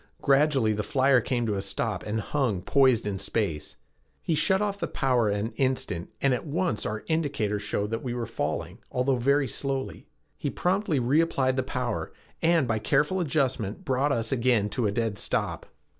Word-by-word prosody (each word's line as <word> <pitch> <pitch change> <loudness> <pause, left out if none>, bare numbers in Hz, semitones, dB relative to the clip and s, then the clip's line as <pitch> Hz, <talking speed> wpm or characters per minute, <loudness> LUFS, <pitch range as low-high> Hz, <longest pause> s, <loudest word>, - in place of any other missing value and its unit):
Gradually 135 -5 +3
the 105 - -1
flyer 130 +4 +3
came 120 0 -1
to 110 - 0
a 100 - -1
stop 100 +2 -2
and 110 +1 -1
hung 110 -7 -1
poised 130 -1 +3
in 100 -2 -2
space. 95 -6 -2 0.5
He 165 - 0
shut 190 +5 +2
off 205 -1 -1
the - - -1
power 125 -6 +1
an 105 +3 -1
instant 130 -10 -1
and 135 -2 +4
at 125 - -2
once 165 -4 -1
our 110 0 -4
indicator 140 -11 0
showed 105 0 -2
that 115 - -2
we 120 -2 -3
were 120 -1 -2
falling, 85 -1 -3
although 130 +1 +1
very 140 +3 +2
slowly. 135 0 -3 0.3
He - - -3
promptly 185 -4 0
reapplied 130 0 +2
the 130 - +1
power, 125 -3 -3 0.3
and 165 -5 +3
by 110 -1 0
careful 150 - +1
adjustment 130 - -1
brought 135 +2 +1
us 115 -2 0
again 120 -5 +2
to 120 -1 0
a - - 0
dead 110 -1 -1
stop. - - -2
125 Hz, 180 wpm, -27 LUFS, 105-140 Hz, 0.5 s, and